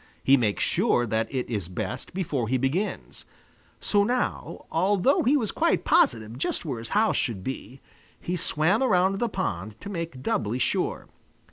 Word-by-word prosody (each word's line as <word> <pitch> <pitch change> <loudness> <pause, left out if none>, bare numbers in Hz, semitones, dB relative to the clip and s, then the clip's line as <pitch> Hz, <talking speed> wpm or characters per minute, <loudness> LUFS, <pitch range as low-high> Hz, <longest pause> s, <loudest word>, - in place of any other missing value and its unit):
He 135 - +6
makes 110 -6 +1
sure 120 - +2
that 110 0 -1
it 130 -3 -2
is 100 -7 -3
best 125 +7 -5
before 145 - -1
he 130 +3 +1
begins. 140 +11 -2 0.6
So 205 -1 +2
now, 245 +4 -2
although 195 - +3
he 275 +5 +3
was 225 -7 -1
quite - - +1
positive 115 +1 +2
just 155 - -2
where 130 -7 -3
his 115 - -8
house 220 +1 +3
should 105 -7 -2
be, 130 +1 -6 0.4
he 180 - -3
swam 170 - +1
around 195 -5 +3
the 240 - 0
pond 105 - -4
to 200 - -7
make 165 -8 -5
doubly 110 -1 0
sure. 130 - -1
140 Hz, 165 wpm, -26 LUFS, 115-195 Hz, 0.6 s, He